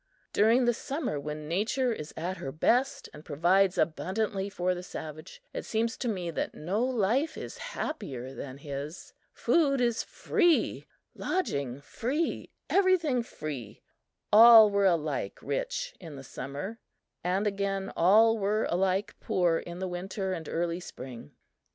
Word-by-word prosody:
During 230 +5 +4
the 240 - +3
summer, 270 - -3
when 150 +1 -6
Nature 225 - +1
is 155 -7 -7
at 180 +4 -3
her 135 - -5
best, 245 - +1
and 150 - -11
provides 180 +6 +2
abundantly 195 +4 -1
for 185 -2 0
the 180 - -5
savage, 155 - -8
it - - -4
seems 230 +2 -1
to 250 - -3
me 180 -6 -2
that - - -3
no 190 +9 -1
life 255 +4 +1
is - - -7
happier 135 - -5
than 135 -1 -7
his! 145 +3 -7 0.2
Food 285 -5 +2
is 235 -2 +1
free 350 -7 +1 0.3
lodging 140 - -2
free 270 - -2 0.2
everything 360 -10 +3
free! 145 - -7 0.5
All 225 -1 +10
were 200 -1 +3
alike 155 -5 0
rich - - -3
in 160 -5 -9
the 135 - -9
summer, 140 - -6 0.4
and, 185 +4 0
again, 195 -1 -1
all 220 +6 +5
were 210 +2 +1
alike 190 +3 +1
poor 175 -3 +1
in 175 0 -8
the 190 +1 -3
winter 185 +2 -3
and 165 -4 -5
early 170 +1 -1
spring. 125 - -10
190 Hz, 145 wpm, -29 LUFS, 160-230 Hz, 0.5 s, All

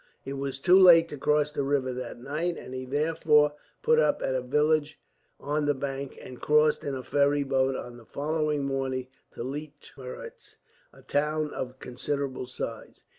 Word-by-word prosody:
It 135 - -4
was 135 -1 -3
too 180 +7 +5
late 170 -3 +8
to 145 - -7
cross 150 +1 +2
the - - -1
river 135 -2 0
that 125 0 -6
night, 155 +7 -2
and 125 - -9
he 130 0 -5
therefore 150 +1 +3 0.3
put 470 0 +4
up - - +3
at 130 - 0
a 130 - 0
village 150 +4 +1 0.4
on 150 +1 -1
the 145 - +2
bank, 135 0 -5
and 125 - -11
crossed 150 0 +3
in 140 -2 -3
a 130 - -5
ferry 145 +1 +2
boat 135 -1 +1
on 120 -1 -7
the 115 - -15
following 150 0 -1
morning 130 -2 -2 0.2
to - - -6
Leitmeritz, 145 - -8 0.4
a - - -18
town 150 +1 0
of 130 0 -5
considerable 130 +1 -4
size. 115 -3 -7
145 Hz, 175 wpm, -28 LUFS, 130-150 Hz, 0.4 s, late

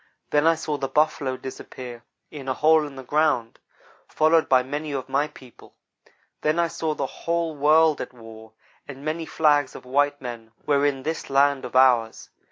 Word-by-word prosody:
Then 150 +2 +3
I 165 - +5
saw 155 -2 -3
the 135 -1 -3
Buffalo 135 -2 0
disappear 125 -2 -9 0.3
in 140 -3 -9
a 130 - -1
hole 155 +1 +4
in 140 - -12
the 130 - -8
ground, 145 -4 0 0.5
followed 160 +1 +2
by 130 -1 +5
many 145 +3 -5
of 130 -2 -4
my 140 +3 0
people. 130 -5 -17 0.7
Then 155 +2 +1
I 170 -1 +2
saw 160 -1 -3
the 140 - -2
whole 165 +2 -3
world 155 +2 +4
at - - -6
war, 110 -2 -13 0.3
and 135 0 -10
many 160 +1 -3
flags 145 -3 +2
of - - -11
white 145 +2 +1
men 115 -3 -8
were 145 -1 +3
in 135 -2 -2
this 160 +3 -4
land 140 -1 +2
of 125 - -9
ours. 125 -4 +3
145 Hz, 180 wpm, -24 LUFS, 130-155 Hz, 0.7 s, I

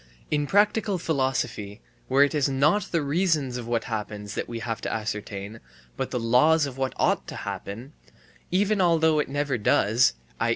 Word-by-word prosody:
In 145 -1 +1
a - - -8
practical 205 +1 +2
philosophy, 130 - -2 0.3
where 135 +2 +5
it 145 - +1
is 145 -2 +1
not 150 +10 +2
the 165 -3 +1
reasons 150 -4 0
of 120 -2 -6
what 115 -1 0
happens 105 -2 -5
that - - -4
we 120 - -4
have 115 -1 -4
to - - -3
ascertain, 105 -1 -5 0.4
but - - -3
the 125 - -2
laws 145 +7 +4
of 135 -3 -6
what 130 0 -2
ought - - +1
to - - -7
happen, 115 +9 -6 0.6
even 200 +2 +2
although 160 -3 +3
it 150 - -1
never 140 -3 -1
does, 105 - +3 0.2
i. 115 - +1
135 Hz, 180 wpm, -25 LUFS, 115-160 Hz, 0.6 s, where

